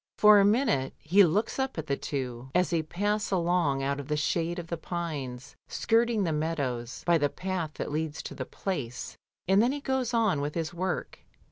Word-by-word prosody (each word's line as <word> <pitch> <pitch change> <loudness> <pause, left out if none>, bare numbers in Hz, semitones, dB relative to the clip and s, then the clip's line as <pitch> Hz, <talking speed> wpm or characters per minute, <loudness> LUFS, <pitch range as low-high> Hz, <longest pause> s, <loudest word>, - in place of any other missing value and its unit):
For 210 -1 +8
a 195 - +5
minute 205 - +2
he 190 +6 +5
looks 195 +9 +1
up 265 -4 -1
at 160 - -3
the 140 - 0
two, 130 -3 -4
as 180 0 +3
they 165 -2 +2
pass 205 +7 -1
along 170 -7 +1
out 140 +1 -1
of 140 - -7
the 150 - 0
shade 165 +3 0
of 175 - -4
the 170 - -3
pines, 150 -7 -5
skirting 230 -2 +2
the 165 -3 0
meadows, 140 -6 -2
by 170 -1 +4
the 145 -1 +2
path 180 -3 -4
that - - -4
leads 155 0 -3
to - - -6
the - - -4
Place, 130 -11 -4 0.3
and 195 +2 +5
then 240 +3 +3
he 290 - -3
goes 265 -3 -1
on 220 -10 +2
with 145 +1 -3
his 165 0 -2
work. 185 +1 -3
170 Hz, 205 wpm, -28 LUFS, 145-200 Hz, 0.3 s, For